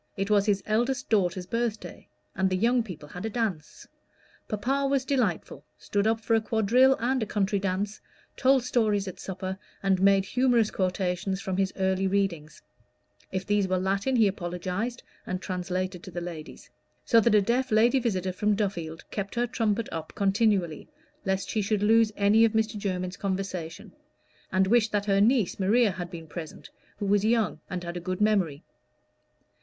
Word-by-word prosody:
It 195 Hz, +2 st, -2 dB
was 205 Hz, 0 st, +3 dB
his 200 Hz, -2 st, +1 dB
eldest 240 Hz, +4 st, -1 dB
daughter's 185 Hz, -3 st, +1 dB
birthday, 230 Hz, +1 st, -4 dB, 0.3 s
and 190 Hz, 0 st, +1 dB
the 185 Hz, -, 0 dB
young 240 Hz, +5 st, +3 dB
people 180 Hz, -9 st, -8 dB
had 180 Hz, -, -8 dB
a 220 Hz, -, -2 dB
dance. 205 Hz, -9 st, -4 dB, 0.6 s
Papa 270 Hz, +7 st, 0 dB
was 270 Hz, -1 st, +1 dB
delightful 250 Hz, -, -1 dB
stood 205 Hz, +1 st, -1 dB
up 225 Hz, 0 st, +1 dB
for 225 Hz, -, 0 dB
a 225 Hz, -, +4 dB
quadrille 235 Hz, +5 st, +3 dB
and 255 Hz, +2 st, 0 dB
a -, -, 0 dB
country 200 Hz, -1 st, 0 dB
dance, 195 Hz, +2 st, -2 dB, 0.3 s
told 265 Hz, -1 st, +3 dB
stories 215 Hz, -5 st, +1 dB
at 185 Hz, -, -7 dB
supper, 190 Hz, 0 st, -5 dB, 0.2 s
and 190 Hz, -1 st, +2 dB
made 195 Hz, 0 st, +4 dB
humorous 240 Hz, -1 st, +2 dB
quotations 185 Hz, 0 st, -1 dB
from 190 Hz, -1 st, -3 dB
his 195 Hz, -1 st, +1 dB
early 190 Hz, 0 st, +1 dB
readings: 185 Hz, -6 st, -2 dB, 0.7 s
if 185 Hz, 0 st, -3 dB
these 205 Hz, -1 st, +1 dB
were 185 Hz, 0 st, +1 dB
Latin, 195 Hz, +7 st, 0 dB
he 225 Hz, -3 st, +5 dB
apologized, 185 Hz, +5 st, -3 dB, 0.2 s
and 185 Hz, 0 st, -2 dB
translated 185 Hz, -1 st, -3 dB
to -, -, -10 dB
the 175 Hz, -1 st, -5 dB
ladies; 170 Hz, -6 st, -8 dB, 0.3 s
so 230 Hz, -, +5 dB
that 225 Hz, 0 st, +3 dB
a -, -, +7 dB
deaf 245 Hz, +5 st, 0 dB
lady 235 Hz, +5 st, +4 dB
visitor 190 Hz, -6 st, -1 dB
from 210 Hz, +2 st, +1 dB
Duffield 175 Hz, -6 st, -3 dB
kept 200 Hz, +1 st, -4 dB
her 240 Hz, +1 st, +1 dB
trumpet 225 Hz, -2 st, -1 dB
up 160 Hz, -1 st, -6 dB
continually, 200 Hz, -, +1 dB, 0.4 s
lest 190 Hz, 0 st, -1 dB
she 215 Hz, -, 0 dB
should 205 Hz, 0 st, 0 dB
lose 225 Hz, +1 st, +4 dB
any 205 Hz, +2 st, +4 dB
of 225 Hz, -1 st, +3 dB
Mr. 220 Hz, 0 st, 0 dB
Jermyn's 185 Hz, -2 st, -3 dB
conversation, 185 Hz, -4 st, -4 dB, 0.6 s
and 190 Hz, 0 st, +3 dB
wished 220 Hz, +2 st, +3 dB
that 205 Hz, -1 st, 0 dB
her 195 Hz, -1 st, +3 dB
niece 225 Hz, -4 st, +2 dB
Maria 210 Hz, +3 st, +3 dB
had 180 Hz, -1 st, -6 dB
been 170 Hz, -2 st, -8 dB
present, 160 Hz, 0 st, -9 dB, 0.3 s
who 205 Hz, -, -3 dB
was 200 Hz, 0 st, +2 dB
young 220 Hz, -7 st, +1 dB
and 180 Hz, -2 st, -4 dB
had 170 Hz, 0 st, -5 dB
a -, -, -3 dB
good 185 Hz, +1 st, -4 dB
memory. 190 Hz, -9 st, +1 dB
200 Hz, 175 wpm, -27 LUFS, 185-225 Hz, 0.7 s, a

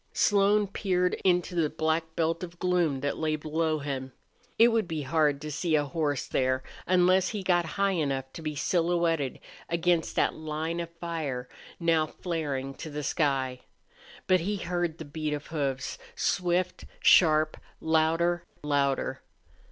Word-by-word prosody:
Slone 205 Hz, 0 st, +3 dB
peered 180 Hz, -2 st, 0 dB
into 180 Hz, -1 st, +2 dB
the 165 Hz, -3 st, +1 dB
black 160 Hz, +1 st, -1 dB
belt 165 Hz, 0 st, 0 dB
of 175 Hz, -1 st, -8 dB
gloom 175 Hz, -7 st, +1 dB
that 145 Hz, +1 st, -2 dB
lay 155 Hz, -1 st, +1 dB
below 155 Hz, +1 st, -1 dB
him. 135 Hz, -3 st, -4 dB, 0.4 s
It 230 Hz, +1 st, +7 dB
would 225 Hz, -5 st, +1 dB
be 160 Hz, -3 st, -3 dB
hard 150 Hz, 0 st, +2 dB
to 150 Hz, -, -5 dB
see 160 Hz, +2 st, 0 dB
a 145 Hz, -, +3 dB
horse 145 Hz, -1 st, -1 dB
there, 130 Hz, 0 st, 0 dB, 0.2 s
unless 185 Hz, +1 st, +4 dB
he 210 Hz, -3 st, -4 dB
got 175 Hz, -2 st, +2 dB
high 200 Hz, 0 st, +3 dB
enough 135 Hz, -6 st, -2 dB
to -, -, -8 dB
be 155 Hz, -1 st, -4 dB
silhouetted 165 Hz, -3 st, +1 dB, 0.3 s
against 170 Hz, -1 st, +1 dB
that -, -, +2 dB
line 155 Hz, +2 st, -3 dB
of 170 Hz, -1 st, -4 dB
fire 150 Hz, -7 st, -3 dB, 0.3 s
now 165 Hz, -2 st, +2 dB
flaring 145 Hz, -7 st, -3 dB
to 160 Hz, -, -5 dB
the 150 Hz, 0 st, -5 dB
sky. 135 Hz, -5 st, 0 dB, 0.7 s
But 185 Hz, 0 st, +4 dB
he 200 Hz, +5 st, -1 dB
heard 175 Hz, -3 st, -2 dB
the 160 Hz, -, -7 dB
beat 150 Hz, +1 st, -3 dB
of 145 Hz, -, -7 dB
hoofs, 135 Hz, -4 st, -2 dB, 0.2 s
swift, 180 Hz, 0 st, 0 dB
sharp, 155 Hz, -2 st, +5 dB, 0.2 s
louder 165 Hz, +2 st, +2 dB, 0.2 s
louder. 140 Hz, -2 st, 0 dB
160 Hz, 150 wpm, -28 LUFS, 145-175 Hz, 0.7 s, It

